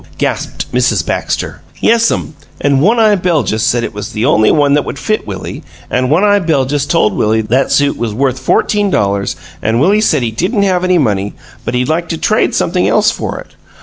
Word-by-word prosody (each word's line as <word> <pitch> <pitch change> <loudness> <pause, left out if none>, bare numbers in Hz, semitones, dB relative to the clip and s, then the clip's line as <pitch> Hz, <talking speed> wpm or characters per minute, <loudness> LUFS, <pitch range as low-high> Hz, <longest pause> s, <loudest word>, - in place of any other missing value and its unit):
gasped - - -3
Mrs. - - +1
Baxter. - - -3 0.2
"Yes'm, 230 -7 +1 0.3
an' 140 -2 +2
One 210 - +3
eye 215 -2 +4
Beljus 165 - 0
said 120 +2 +1
it - - -4
was 105 0 -7
the 110 +3 -1
only 110 -6 +3
one 145 -2 +3
that 145 0 +2
would - - -6
fit 215 - -2
Willie, 100 -2 -6 0.3
an' 125 0 0
One 160 +7 +3
eye 205 0 +4
Beljus 145 -5 0
told 105 - +2
Willie 110 +1 +1
that 125 +5 0
suit 145 0 +2
was 120 -2 -2
worth 130 +3 -1
fourteen 205 +9 +1
dollars, 100 - 0 0.3
an' 110 +7 0
Willie 195 - +3
said 155 - +2
he 115 - -1
didn't 195 - 0
have 185 -2 +1
any 185 -1 +2
money, 105 - -1 0.3
but 125 - -3
he'd 125 0 0
like 165 +2 -1
to 165 - -2
trade 215 +6 +1
something 180 +1 +1
else 215 +1 +3
for - - -5
it. - - -16
145 Hz, 205 wpm, -13 LUFS, 115-185 Hz, 0.3 s, eye